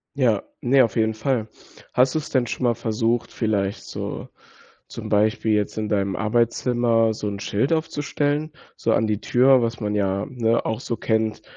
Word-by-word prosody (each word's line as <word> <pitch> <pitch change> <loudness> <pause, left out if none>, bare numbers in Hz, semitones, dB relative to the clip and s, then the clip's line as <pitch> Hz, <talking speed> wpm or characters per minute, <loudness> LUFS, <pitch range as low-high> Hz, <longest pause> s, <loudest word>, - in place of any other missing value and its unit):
Ja, 115 -7 +2 0.2
ne, 130 +1 +4
auf 115 -2 -1
jeden 110 -1 +2
Fall. 110 0 -1 0.5
Hast 130 +3 +3
du's 155 - -2
denn 130 -3 +1
schon 125 - -3
mal 120 - +2
versucht, 115 +1 -1
vielleicht 100 -3 -1
so - - -6 0.6
zum - - -7
Beispiel 110 +1 +2
jetzt 105 +1 -1
in 110 -1 -1
deinem 100 -2 0
Arbeitszimmer 115 0 +2
so 105 -1 -5
'n 100 -1 -5
Schild 115 +8 -1
aufzustellen, 150 -1 -1 0.2
so 115 - -1
an 110 - +2
die 105 -1 -1
Tür, 130 +2 +4
was 115 -1 -2
man 105 -1 -2
ja, 100 0 0
ne, 115 -3 0
auch 110 +3 -2
so 115 - -3
kennt, 110 -1 0
115 Hz, 175 wpm, -23 LUFS, 105-125 Hz, 0.6 s, ne